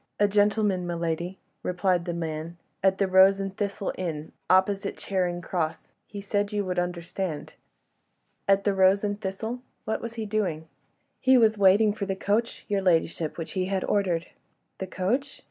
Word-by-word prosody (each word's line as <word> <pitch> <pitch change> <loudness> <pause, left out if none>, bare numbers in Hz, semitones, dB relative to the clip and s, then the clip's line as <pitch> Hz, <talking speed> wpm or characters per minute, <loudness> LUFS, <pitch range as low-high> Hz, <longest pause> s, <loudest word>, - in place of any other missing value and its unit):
"A 205 - +5
gentleman, 205 -2 +2
my 175 - -2
lady," 170 +2 -2 0.2
replied 180 -1 0
the 175 - -2
man, 165 0 -4 0.2
"at 190 0 +3
'The 195 - +2
Rose 190 +1 +6
and 195 0 -4
Thistle' 200 -1 -2
inn 160 -4 -4 0.2
opposite 195 +1 +2
Charing 180 -3 -1
Cross. 165 -3 -3
He 205 - -7
said 205 0 -1
you 205 -1 -1
would 180 -1 -1
understand." 175 -1 -4 0.9
"At 195 0 +4
'The 205 - +2
Rose 190 +1 +4
and 205 0 -2
Thistle'? 220 +6 -4 0.3
What 220 - -2
was 230 0 -6
he 225 -2 -3
doing?" 195 -7 -2 0.5
"He 260 0 +5
was 220 -2 +5
waiting 205 +2 +5
for 200 -2 -4
the 195 - -1
coach, 215 +4 -1
your 200 -2 0
ladyship, 165 -3 +1
which 165 -2 -5
he 185 -1 -1
had 190 0 -1
ordered." 180 -5 0 0.5
"The 190 - -4
coach?" 245 +11 -2
190 Hz, 170 wpm, -27 LUFS, 175-205 Hz, 0.9 s, Rose